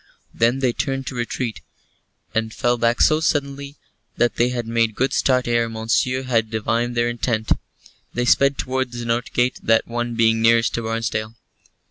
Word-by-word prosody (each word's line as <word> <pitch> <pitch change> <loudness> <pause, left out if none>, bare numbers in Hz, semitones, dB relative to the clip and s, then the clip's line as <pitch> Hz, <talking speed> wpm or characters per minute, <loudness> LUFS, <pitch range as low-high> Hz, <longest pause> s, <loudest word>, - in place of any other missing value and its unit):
Then 120 +4 +1
they 125 -3 +2
turned 135 +1 -2
to - - -5
retreat, 120 -1 -3 0.7
and 110 0 -1
fell 120 +2 +1
back 115 +1 +1
so 155 0 +5
suddenly 140 -2 -2 0.4
that 120 -1 +2
they 120 +1 +3
had 120 -2 -3
made 115 -1 0
good 130 +2 0
start 130 -2 +2
ere 115 -1 +1
Monceux 115 +3 0
had 115 -4 0
divined 115 +2 -1
their 120 0 +2
intent. 115 -2 -2 0.6
They 120 +1 -1
sped 140 +3 +3
towards 130 -1 -2
the 120 - -5
north 120 +2 -1
gate, 125 +1 0
that 115 0 +2
one 120 0 -3
being 115 -1 +3
nearest 115 +1 +4
to 115 - -1
Barnesdale. 110 -1 -3
120 Hz, 170 wpm, -21 LUFS, 115-125 Hz, 0.7 s, so